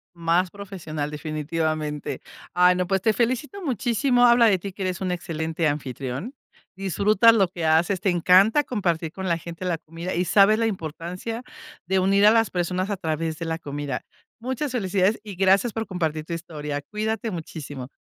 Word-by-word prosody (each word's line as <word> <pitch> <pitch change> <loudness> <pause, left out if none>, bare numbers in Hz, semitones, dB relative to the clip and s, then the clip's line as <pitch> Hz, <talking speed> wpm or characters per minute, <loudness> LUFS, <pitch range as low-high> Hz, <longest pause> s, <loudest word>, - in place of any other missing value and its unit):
Más 170 +2 +1
profesional 165 -7 -6
definitivamente. 155 0 -3 0.3
Ah, 180 +1 +5
no, 180 0 -1
pues 195 0 +1
te 220 +3 +2
felicito 255 - -1
muchísimo, 245 - +2
habla 235 -1 +6
de 195 -4 +4
ti 195 +1 -7
que 195 - -7
eres 185 -2 -2
un 185 -1 -2
excelente 165 -2 -2
anfitrión, 140 - -3 0.4
disfrutas 200 +4 +4
lo 195 -5 +3
que 170 -2 -5
haces, 165 +4 +2
te 195 - +3
encanta 185 - +5
compartir 170 -10 -1
con 190 0 -5
la 170 -2 +1
gente 170 +2 -8
la 175 -2 -1
comida, 165 +4 -6
y 180 +1 0
sabes 200 +4 +5
la 230 - +2
importancia 180 +4 -5 0.4
de 190 +1 +1
unir 195 +2 +4
a - - +9
las 225 -1 +3
personas 180 +2 -1
a 200 - -2
través 160 -1 -2
de 165 - -4
la 165 0 -2
comida. 145 -4 -5 0.3
Muchas 260 +3 -3
felicidades, 200 -2 +1
y 205 -3 -8
gracias 195 +4 +3
por 225 0 -3
compartir 160 -4 -2
tu 170 - -3
historia. 150 -3 -5
Cuídate 220 +5 -3
muchísimo. 150 -7 -7
180 Hz, 175 wpm, -24 LUFS, 160-210 Hz, 0.4 s, a